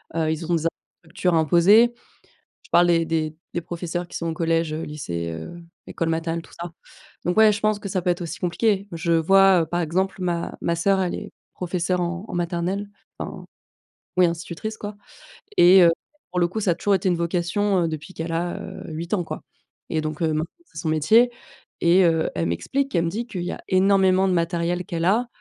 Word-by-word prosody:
heu, 160 -1 +1
ils 160 +1 -4
ont 175 - +3
des 165 0 -2
infrastructures 170 +2 -3
imposées, 175 +9 +5 0.7
je - - -20
parle 175 0 +5
des 165 -1 +3 0.5
des 175 - -1
professeurs 175 0 -4
qui - - -5
sont 170 - -3
au 165 - -1
collège, 165 -1 0
heu, 155 - -3
lycée, 85 - -4
heu, 80 - -7 0.3
école 165 - -2
maternelle, 165 +1 -1
tout - - -18
ça. 170 0 -5 0.5
Donc, 180 +2 -1
ouais, 220 -1 +7
je 205 - -3
pense 215 -1 +1
que 205 - -6
ça 185 -1 -1
peut 180 - -1
être 175 0 0
aussi 170 - -6
compliqué. 200 +3 0
Je 170 0 -1
vois, 190 +2 +5
heu, - - 0
par 175 +2 -2
exemple, 185 +4 -1
ma 170 -2 -2
ma 170 - 0
sœur 195 +3 +2
elle 180 -2 -1
est - - -7 0.2
professeure 180 0 -1
en 175 +3 -3
en - - -8
maternelle. 175 +3 -2 0.3
Enfin, - - -6 0.7
oui 180 -1 +6
institutrice 175 +5 -4
quoi 205 0 -6 0.6
et 185 +2 +8
heu, 170 -1 +7 0.4
pour 180 - -2
le 175 - +4
coup 220 +5 -4
ça 195 - +1
a - - -1
toujours 200 +4 +1
été 190 0 +1
une 175 - +1
vocation, 175 +3 0
heu, - - +1
depuis 155 +3 -7
qu'elle 165 +1 -4
a, 175 +1 -2
heu, - - -8
8 165 +2 -6
ans 180 -4 0
quoi - - -6 0.5
et 160 - +1
donc, 155 +2 -4
heu, 165 - +2
maintenant 155 +1 0 0.2
c'est - - -12
son 165 - -3
métier 215 +11 +4 0.5
et 180 +2 +5
heu, 165 -2 +2
elle 85 - 0
m'explique, 265 - -2
elle 170 - +2
me - - -1
dit 230 +6 -4
qu'il 185 -7 -5
y 175 - -3
a - - -7
énormément 190 0 +4
de - - +1
matériel 170 +1 0
qu'elle 165 -1 -3
a, 225 +6 +3
175 Hz, 215 wpm, -23 LUFS, 165-190 Hz, 0.7 s, et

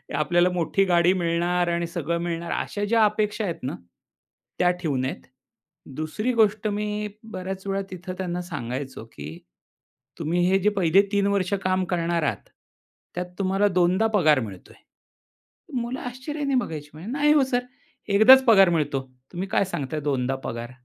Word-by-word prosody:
आपल्याला 175 +4 +3
मोठी 180 +3 +1
गाडी 175 -1 +4
मिळणार 175 0 0
आणि 170 0 -1
सगळं 170 0 -2
मिळणार 170 0 -3
अशा 205 - -3
ज्या 225 +1 +3
अपेक्षा 210 +1 0
आहेत 170 -4 -2
ना, 130 - -3 0.8
त्या 180 0 +4
ठेऊ 150 -6 -1
नयेत. 130 +1 -3 0.7
दुसरी 210 +11 -2
गोष्ट 215 -2 +2
मी 210 0 -2 0.2
बऱ्याच 190 +1 -5
वेळा 195 0 -1
तिथं 185 0 -6
त्यांना 180 -1 -3
सांगायचो 130 -6 -6
की 75 0 -8 0.9
तुम्ही 165 +2 -1
हे 195 0 +3
जे 210 +3 +3
पहिले 180 +2 +5
3 200 -1 +2
वर्ष 200 -1 0
काम 185 0 +1
करणार 170 -2 -1
आहात, 115 -9 -3 0.7
त्यात 180 - -2
तुम्हाला 195 +1 +2
2दा 185 +5 +3
पगार 155 -7 +4
मिळतोय. 100 -7 -8 1.0
मुलं 240 +2 -4
आश्चर्याने 275 +3 -3
बघायची, 155 -11 -2
म्हणे 165 +7 -10
"नाही 295 +2 +3
हो 290 -3 +4
सर. 245 - +2 0.5
1दा 220 +6 +8
च 265 - 0
पगार 195 -6 +7
मिळतो. 145 -5 0 0.3
तुम्ही 185 +3 -3
काय 195 - +1
सांगताय 150 -3 -4
2दा 130 0 0
पगार." 120 +1 -5
180 Hz, 155 wpm, -24 LUFS, 165-205 Hz, 1.0 s, 1दा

